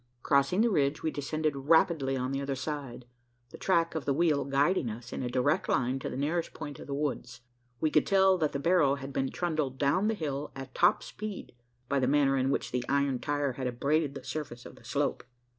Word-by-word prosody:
Crossing 140 +7 +3
the 235 - +4
ridge, 145 -4 +1
we 160 - 0
descended 155 +1 -2
rapidly 140 -1 +2
on 130 +1 -2
the 135 0 -2
other 140 0 -2
side 135 -3 -5 0.5
the - - -10
track 170 -3 +2
of 160 -3 -4
the 140 - +1
wheel 155 -4 +2
guiding 140 +1 +2
us 115 +3 -8
in - - -3
a 125 - -2
direct 130 +4 +1
line 130 0 +1
to - - -4
the - - -5
nearest 160 +5 -1
point 150 -2 -7
of - - -10
the 140 - -4
woods. 125 -5 -3 0.4
We 155 - +1
could 150 - +3
tell 190 -1 +4
that 155 -2 +1
the - - -2
barrow 145 -2 +3
had 135 0 -8
been 135 0 0
trundled 155 -7 -2
down 145 +9 +2
the 220 - +1
hill 145 -5 -4
at 135 -1 -8
top 175 - +3
speed 215 -2 -7 0.4
by 140 +1 +1
the 130 - +1
manner 140 0 +3
in 130 0 +1
which 140 - -1
the 125 0 -1
iron 140 -2 +1
tire 145 0 -1
had 130 0 -4
abraded 140 +4 0
the 135 - -7
surface 125 -6 -6
of - - -11
the - - -18
slope. - - -1
140 Hz, 225 wpm, -30 LUFS, 135-155 Hz, 0.5 s, the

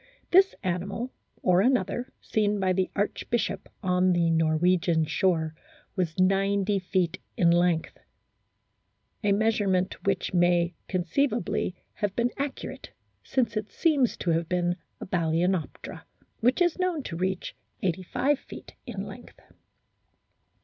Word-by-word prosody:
This 385 +2 +6
animal, 195 +7 -2 0.3
or 180 0 +4
another 250 +1 +1
seen 210 -1 +1
by 185 -1 +2
the 185 0 0
archbishop 215 +3 -1
on 180 0 +3
the 170 -1 +2
Norwegian 165 +1 +2
shore, 160 0 +1 0.4
was 175 -5 -1
90 195 +1 +2
feet 180 -2 0 0.2
in 170 -2 +5
length, 175 -1 +1 1.2
a 205 - +3
measure 215 0 +2
ment 185 0 0
which 195 -2 0
may 175 -1 +3
conceivably 190 +1 0 0.2
have 205 -3 -2
been 240 +1 +1
accurate, 280 -1 -5 0.3
since 235 -5 0
it 215 -1 -2
seems 290 -8 +2
to 175 - 0
have 165 0 0
been 175 -1 +1 0.2
a - - -6
Balcenoptera, 170 0 -1 0.4
which 250 +9 +3
is 350 +1 0
known 360 -5 0
to 165 - -5
reach 185 +1 -2 0.3
85 190 - 0
feet - - -11
in - - -4
length. - - -11
185 Hz, 125 wpm, -27 LUFS, 175-220 Hz, 1.2 s, This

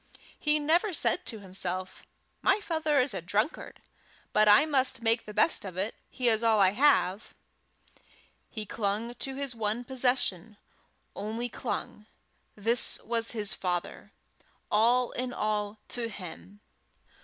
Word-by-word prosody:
He 300 0 +2
never 335 +7 +1
said 360 +2 +1
to 220 -3 -4
himself, 185 -1 -4 0.3
"My 390 +2 +3
father 320 -7 0
is 255 +1 +1
a 190 - -4
drunkard, 210 - -2 0.5
but 215 0 +4
I 210 +8 +7
must 265 -5 +1
make 230 0 +1
the 210 - -8
best 215 +10 +2
of 185 -3 -8
it; 200 +4 -1 0.2
he 250 - -2
is 225 -1 +3
all 225 -2 +4
I 190 -2 +5
have!" 220 -5 +2 1.1
He 215 -2 -6
clung 210 +3 -2
to 265 +2 -5
his 275 -2 -1
one 225 +1 -2
possession 245 -6 0 0.6
only 225 +4 -4
clung: 210 -1 -5 0.5
this 230 +4 +3
was 230 0 0
his 210 -2 +1
father 175 -2 -4 0.6
all 240 +3 +3
in 250 0 -4
all 210 -1 -2
to 235 -2 -2
him. 195 +1 -10
225 Hz, 140 wpm, -29 LUFS, 205-255 Hz, 1.1 s, I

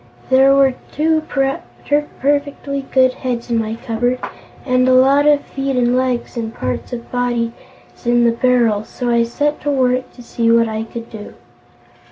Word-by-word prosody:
There 270 +1 +6
were 270 -1 +4 0.2
two 315 +1 +1
perfectly 280 0 -2
good 260 -1 +4
heads 245 -2 -4
in 230 - +2
my 220 0 -3
cupboard, 245 +2 -1 0.5
and 255 -1 +2
a 255 - +5
lot 275 +3 +4
of 295 -1 +4
feet 270 0 -3
and 245 0 +2
legs 255 -1 -1
and 225 -2 -3
parts 125 - -4
of 235 -1 -7
bodies 240 -2 -1 0.5
in 240 0 +3
the 235 - +4
barrel, 235 -3 +2
so 245 +2 -4
I 235 0 +3
set 290 +6 -2
to 290 - -2
work 255 -2 +1
to 245 - -13
see 230 -1 -1
what 230 0 +4
I 220 0 -3
could 230 0 -9
do. 215 -2 -9
250 Hz, 170 wpm, -18 LUFS, 235-275 Hz, 0.5 s, There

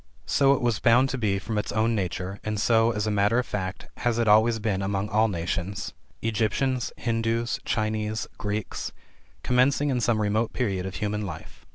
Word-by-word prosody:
So 140 0 +4
it - - -4
was 120 -4 +1
bound 125 +2 +4
to 135 - -2
be 100 -4 +1
from 105 +2 -2
its - - -3
own 110 +2 +1
nature, 95 -1 -3
and 105 -1 -2
so, 115 +1 +4
as 105 -2 -1
a 110 - 0
matter 105 +3 +2
of 125 - +1
fact, 95 -1 -4
has 120 -1 0
it 115 -1 +1
always 110 +2 +5
been 105 -3 -1
among 100 +1 -1
all 110 +2 +3
nations 95 +2 -3 0.3
Egyptians, 115 +4 0
Hindus, 115 0 -1
Chinese, 110 0 -1
Greeks 105 0 -3 0.5
commencing 135 +3 +3
in 125 -2 0
some 115 -1 +2
remote 110 +2 0
period 95 -7 -1
of 95 - -6
human 105 0 -2
life. 85 -6 -9
110 Hz, 185 wpm, -26 LUFS, 100-115 Hz, 0.5 s, always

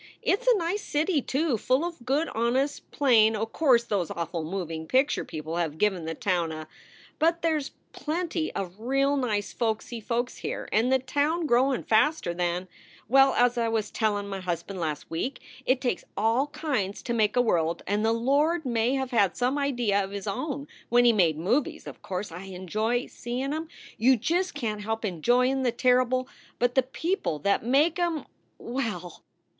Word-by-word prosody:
It 395 - +2
s - - -14
a 465 - +4
nice 365 +3 -1
city, 305 -1 0
too, 270 -2 0
full 260 +9 +1
of 335 -7 -6
good, 290 +5 +1
honest, 255 +5 -1
plain 225 -6 +4
o 215 +1 -1
course 245 -1 +3
those 200 -7 -1
awful 170 0 -3
moving 165 -2 -4
picture 265 - +2
people 160 +1 -5
have 160 -3 -1
given 190 -3 +1
the 165 0 -3
town 175 -2 0
a 155 0 -7 0.5
But 335 +2 +2
there 325 -1 +3
s 295 0 -4 0.2
plenty 325 0 -2
of 185 +1 -5
real 275 +4 +1
nice 220 -7 -1
folksy 225 0 -2
folks 240 +3 -2
here; - - -4
and 230 +4 +2
the 265 - +5
town 290 +6 0
growin 260 0 +2
faster 220 - +2
than 175 +1 -1 0.4
Well, 270 +3 +5
as 245 0 +3
I 230 - +1
was 220 -2 -1
tellin 205 -2 -1
m 195 - -4
husband 185 +2 -4
last 155 -3 -4
week, 245 +12 -3 0.3
it 255 0 +3
takes 245 -7 -1
all 225 +7 +2
kinds 285 -10 -2
to 240 - -2
make 215 -2 +2
a 245 - +5
world 170 -6 0
and 205 +2 0
the 225 - +3
Lord 285 +8 +2
may 240 +1 +1
have 265 -1 -2
had 205 -6 +2
some 250 +2 +1
idea 240 -8 +1
of 190 - -6
his 200 -1 -6
own 280 +7 -3 0.2
when 245 +1 +5
he 235 - +6
made 170 -7 +3
movies; 225 - 0
of - - -10
course, 185 0 -4
I 180 +3 -8
enjoy 215 +6 -1
seein 255 +4 -4
em. 320 +1 -3 0.3
You 255 +3 +5
just 345 - 0
can 225 -7 -2
t - - -7
help 225 +1 -2
enjoyin 245 - +2
the 250 -2 +2
terrible 255 +1 +2 0.3
But 245 0 +1
the 265 - +4
people 320 - -2
that 200 - +2
make 290 +9 +3
em 340 -3 0 0.3
well! 225 -9 -4
240 Hz, 185 wpm, -27 LUFS, 200-275 Hz, 0.5 s, he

